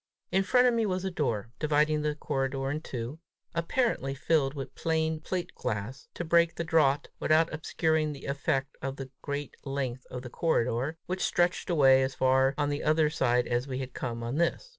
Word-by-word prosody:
In 190 - +3
front 250 +6 +4
of 245 - +4
me 230 -1 +2
was 185 0 -1
a 190 - -1
door, 115 - -1
dividing 150 0 +2
the 150 0 -1
corridor 135 -2 -2
in 150 +2 -3
two, 125 +2 -5 0.3
apparently 170 - 0
filled 140 -1 +1
with 135 -2 -6
plain 160 -1 0
plate 175 +3 -4
glass, 110 +6 -4
to - - -3
break 170 0 +3
the 170 - -2
draught 150 -4 +2
without 160 +1 +3
obscuring 160 0 0
the 140 - -9
effect 140 0 -1
of 135 0 -3
the 135 -2 -8
great 145 -1 -4
length 135 -3 -3
of 125 0 -6
the 125 - -7
corridor, 135 -1 0
which 185 +1 -3
stretched 175 +1 +1
away 135 -6 +6
as 130 0 -1
far 130 +1 +3
on 145 -1 +1
the 145 0 -2
other 155 0 +3
side 125 -5 +2
as 120 +2 -1
we 130 -2 -3
had 130 -1 -5
come 115 -2 -4
on 120 +5 -3
this. 170 - 0
145 Hz, 195 wpm, -29 LUFS, 130-160 Hz, 0.3 s, away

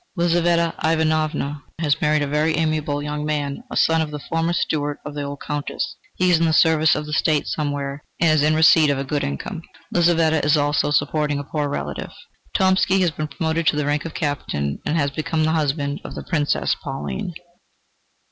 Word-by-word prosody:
Lizaveta 170 -1 +2
Ivanovna 155 -2 0 0.2
has 155 -2 0
married 150 -1 +2
a - - -1
very 150 +2 +1
amiable 155 -2 0
young 150 0 -3
man, 150 - -2
a - - -4
son 160 0 +3
of 155 - -2
the 150 - -5
former 165 +3 -1
steward 145 -4 -1
of 150 - -6
the 145 - -4
old 140 0 -6
Countess. 150 - -3 0.2
He 185 0 +2
is 165 - +4
in 165 - +3
the 160 - +2
service 160 0 +4
of 150 - -3
the 150 - -6
State 155 -1 +2
somewhere, 145 -1 -3 0.2
and 165 -1 +4
is 155 -1 +3
in 155 +1 +3
receipt 160 -1 +6
of 140 - +1
a 135 - -2
good 145 +2 -2
income. 70 -1 -4 0.3
Lizaveta 165 -3 +3
is 150 +1 +4
also 145 0 +1
supporting 150 0 +1
a 145 - -3
poor 145 0 -2
relative. 75 - -4 0.5
Tomsky 190 0 +3
has 175 -2 +2
been 155 -1 -4
promoted 160 +1 -2
to - - +4
the 150 -1 0
rank 145 0 0
of 165 - -7
captain, 75 - -2
and 160 - +1
has 140 -2 +1
become 155 +2 -1
the 160 - +2
husband 145 -2 -1
of - - -8
the - - -6
Princess 150 -4 0
Pauline. 165 +6 -4
155 Hz, 200 wpm, -22 LUFS, 145-160 Hz, 0.5 s, receipt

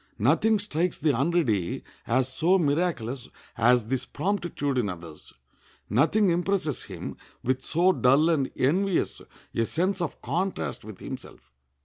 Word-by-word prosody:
Nothing 170 - +3
strikes 180 -4 -1
the 155 - +2
unready 130 - +1 0.2
as 130 +3 +2
so 175 +7 +3
miraculous 145 -6 -1 0.3
as 120 0 +4
this 130 +2 -1
promptitude 175 -10 -1
in 105 -5 0
others; 85 -4 -9 0.6
nothing 175 - +4
impresses 175 -4 0
him - - -7 0.3
with 130 +1 0
so 175 +4 +3
dull 140 0 +4
and 145 -5 +1
envious 180 +8 +1 0.3
a 115 - +1
sense 185 +3 0
of 170 - -3
contrast 170 - -2
with - - -10
himself. - - -9
150 Hz, 130 wpm, -27 LUFS, 125-180 Hz, 0.6 s, as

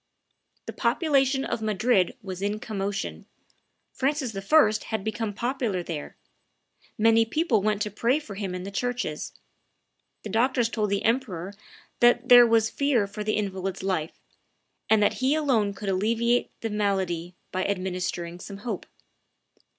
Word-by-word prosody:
The - - -6
population 270 -4 +2
of 225 - -3
Madrid 215 -2 +1
was 190 -1 -6
in 205 +1 -1
commotion; 200 -2 -4 0.7
Francis 270 -4 -1
I. 215 +2 +3
had 220 -3 -3
become 220 0 -2
popular 235 -4 -2
there; 160 -4 -6 0.8
many 225 +1 +5
people 230 - +1
went 210 0 +1
to 210 - -4
pray 235 +6 +1
for 290 -9 -8
him 195 -2 -4
in 180 - -5
the 200 - -6
churches; 245 -8 -3 0.9
the 215 - -6
doctors 240 +2 +2
told 215 -3 -1
the 200 0 0
emperor 205 -7 -1 0.5
that 240 +1 +4
there 245 -1 +9
was 225 -1 +3
fear 280 -7 +2
for 210 +1 -6
the 215 0 0
invalid's 190 -2 -3
life, 175 -5 -2 0.7
and 220 -1 +5
that - - +3
he 265 +3 +3
alone 255 -10 +2
could 205 - -7
alleviate 230 +5 +1
the 225 - -3
malady 190 -4 -1 0.2
by 185 0 -1
administering 180 -3 -3
some 200 +1 -8
hope. 210 -2 -5
215 Hz, 145 wpm, -26 LUFS, 195-240 Hz, 0.9 s, there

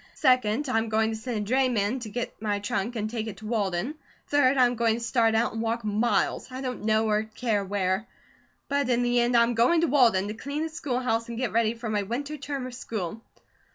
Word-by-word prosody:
Second, 255 0 +2
I'm 225 -2 0
going 220 0 +2
to - - -3
send 225 +1 -4
a 240 - -1
drayman 250 -3 +2
to 230 -3 -7
get 240 +1 -5
my 210 -2 0
trunk 205 +3 -2
and 215 -1 -1
take 225 0 -4
it 210 - -6
to 220 - -11
Walden. 210 +2 -1 0.3
Third, 280 -2 +3
I'm 245 -1 +4
going 230 -2 +2
to - - -4
start 230 -1 +2
out 230 +2 +1
and 225 - -3
walk 230 +1 -1
miles, 215 +4 0
I 255 - -6
don't 250 -5 -4
know 220 0 +3
or 210 0 +2
care 220 -1 -1
where; 195 +2 -1 0.6
but 280 -2 0
in 245 0 +2
the 245 0 +2
end, 240 0 +3
I'm 235 +1 +4
going 245 +9 +3
to 335 - +3
Walden 230 -9 +4
to - - -3
clean 280 +7 -4
the 320 - -2
schoolhouse 250 -7 -2
and 235 - -5
get 245 -4 -1
ready 225 +1 +2
for 230 0 -6
my 210 -1 0
winter 265 +9 -4
term 280 -2 -4
of 255 - -7
school." 220 -4 -5
230 Hz, 225 wpm, -27 LUFS, 215-255 Hz, 0.6 s, I'm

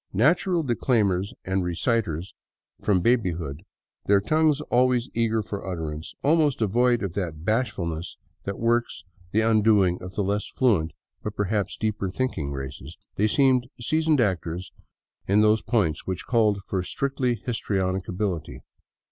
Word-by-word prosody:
Natural 165 - +3
declaimers 110 -6 +1
and 95 0 0
reciters 90 -1 -1 0.5
from 95 -4 +2
baby 115 -4 +2
hood, 80 -3 -6 0.5
their 100 0 +5
tongues 155 +6 +2
always 125 -2 +2
eager 115 -1 +1
for 100 +1 -6
utterance, 80 -3 -5
almost 150 -2 +3
devoid 120 +2 +2
of 95 -4 -3
that 85 -5 -4
bashfulness 95 -8 -1 0.3
that 100 0 -4
works 120 -5 0 0.3
the 110 - +3
undoing 105 -5 +3
of 90 +1 -8
the 105 - 0
less 100 +2 -1
fluent 100 -11 +1 0.3
but 105 -1 -5
perhaps 105 0 -1
deeper 105 -3 -1
thinking 90 - -2
races, 70 +2 -7 0.2
they 105 - +2
seemed 130 +1 +3
seasoned 155 +4 +2
actors 90 -4 -2 0.6
in 100 +2 +4
those 110 +1 +4
points 100 - 0
which 95 -2 -3
called 105 -5 +2
for 95 -1 -2
strictly 130 +4 -1
histrionic 95 -5 -2
ability. 90 -4 -3
105 Hz, 140 wpm, -25 LUFS, 90-120 Hz, 0.6 s, their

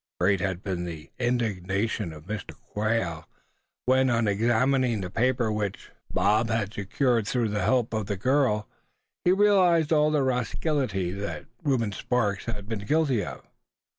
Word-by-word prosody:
Great 95 +2 +3
had 95 -2 -2
been 95 -3 -2
the 80 -2 -8
indignation 105 -5 -1
of 75 -1 -11
Mr. 95 -6 -6
Quail 105 -7 -2 0.6
when, 130 +1 +4
on 115 -2 +2
examining 120 +3 +2
the 90 -2 -5
paper 120 0 +1
which 105 -2 -3 0.2
Bob 105 +5 +2
had 110 -2 -1
secured 115 +2 0
through 120 -2 0
the 105 -1 -1
help 120 +3 +1
of 110 -2 -2
the 100 -2 -2
girl, 125 -2 +2 0.6
he 175 - +4
realized 185 -5 +4
all 150 0 +4
the 150 -2 +2
rascality 125 - -1
that 100 +2 -5 0.2
Reuben 130 -9 +1
Sparks 105 -2 -1
had 105 -4 -5
been 110 -2 -3
guilty 145 -7 +2
of. - - -8
110 Hz, 150 wpm, -27 LUFS, 100-130 Hz, 0.6 s, when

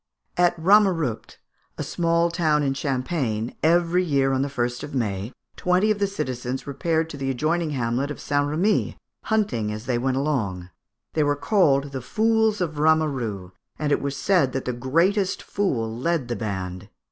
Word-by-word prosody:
At 175 0 +3
Ramerupt, 175 - +2 0.4
a - - -3
small 170 0 +1
town 155 -4 +2
in 135 -1 +1
Champagne, 130 -4 -2
every 170 +2 +3
year, 140 -5 +2
on 130 - +1
the 140 - 0
1st 120 -3 -2
of 145 - -7
May, 105 -3 -2 0.2
twenty 180 +4 +2
of 210 - -1
the 200 - +2
citizens 130 -8 -4
repaired 160 +3 -1
to 145 - -7
the 135 -1 -2
adjoining 155 +5 0
hamlet 130 0 -1
of 145 - -6
St. 145 0 0
Remy, 180 +8 +1 0.3
hunting 205 - 0
as 110 +2 -6
they 125 -2 0
went 130 +1 0
along. 105 -11 -2 0.4
They 155 - +1
were 145 0 +2
called 145 -5 +2
the 135 -1 -4
fools 220 - +1
of 155 -4 -2
Rameru, 135 - +1 0.3
and 150 -1 -1
it - - +2
was 140 0 -3
said 175 -10 +2
that 135 - -3
the 125 - -1
greatest 170 - +1
fool 115 - -1
led 135 0 -1
the 120 - -1
band. 95 -3 -5
145 Hz, 170 wpm, -24 LUFS, 125-170 Hz, 0.4 s, At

